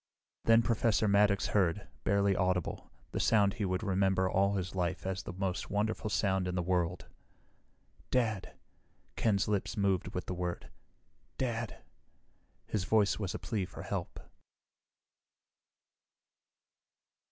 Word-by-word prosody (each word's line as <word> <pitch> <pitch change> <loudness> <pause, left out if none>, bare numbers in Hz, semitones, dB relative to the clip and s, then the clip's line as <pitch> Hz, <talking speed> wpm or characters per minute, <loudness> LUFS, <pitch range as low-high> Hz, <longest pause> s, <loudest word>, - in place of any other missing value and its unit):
Then 115 0 +6
Professor 115 -1 +2
Maddox 100 0 +4
heard, 95 -1 +1 0.2
barely 100 0 +3
audible, 90 -2 -1 0.2
the - - -2
sound 100 -3 +4
he 105 - -2
would 95 +1 -1
remember 95 -1 +2
all 100 +2 +2
his 90 -1 -3
life 95 0 -2
as 95 0 -2
the 90 - -7
most 95 -1 -2
wonderful 110 +2 -1
sound 95 -3 +1
in 90 - -2
the 90 - 0
world. 90 0 0 1.0
"Dad...." 110 -6 0 0.6
Ken's 100 -4 +1
lips 105 0 -1
moved 100 -3 +1
with 90 - -2
the - - -3
word. 90 -1 -4 0.7
"Dad...." 115 -3 -3 0.8
His 105 -4 -1
voice 105 +1 +2
was 95 -3 -3
a - - -1
plea 105 -5 -2
for - - -9
help. - - -4
100 Hz, 130 wpm, -32 LUFS, 90-105 Hz, 1.0 s, Then